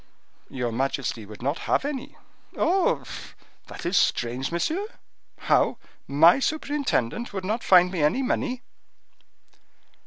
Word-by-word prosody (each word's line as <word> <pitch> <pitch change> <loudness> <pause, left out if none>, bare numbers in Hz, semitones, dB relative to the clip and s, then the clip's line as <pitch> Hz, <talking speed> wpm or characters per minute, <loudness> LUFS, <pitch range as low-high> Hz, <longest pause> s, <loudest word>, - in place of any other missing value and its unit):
"Your 125 -3 -3
majesty 125 -3 -2
would 105 +2 -11
not 140 +5 -1
have - - +2
any." 285 -1 -5 0.4
"Oh! 365 +3 +2 0.6
that - - -9
is 175 +3 0
strange, 125 0 +1
monsieur! 320 - -1 0.5
How! - - +2 0.3
my 160 - +6
superintendent 275 - -1
would 190 -2 -4
not 220 +4 -2
find 180 -1 +6
me 180 -4 -2
any 195 - +2
money?" 255 0 -1
180 Hz, 120 wpm, -25 LUFS, -, 0.6 s, my